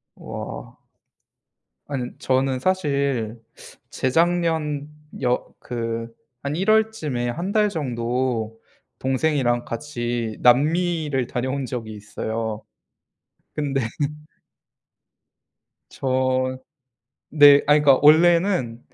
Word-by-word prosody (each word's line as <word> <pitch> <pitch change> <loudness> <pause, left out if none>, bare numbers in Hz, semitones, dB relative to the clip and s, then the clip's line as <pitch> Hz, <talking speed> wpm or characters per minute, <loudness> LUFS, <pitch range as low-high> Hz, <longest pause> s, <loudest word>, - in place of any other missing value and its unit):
와. - - -8 1.1
안은 130 -4 -5
저는 130 0 +1
사실 140 -10 -1 0.5
재작년 160 0 0 0.3
여 125 -1 -1
그 115 -1 -4 0.3
한 140 +1 -2
1 190 +5 -1
월쯤에 215 - +1
1 170 +10 -3
달 210 0 +3
정도 120 - -2 0.4
동생이랑 130 -3 0
같이 120 -3 -4
남미를 150 0 +2
다녀온 130 +2 -2
적이 115 -3 -5
있어요. 110 +1 -4 0.9
근데 140 -2 -1 2.1
저 130 0 0 0.8
네 145 -1 +8
아 145 - +5
그니까 145 -3 +5
원래는 165 - +4
130 Hz, 150 characters per minute, -23 LUFS, 120-155 Hz, 2.1 s, 네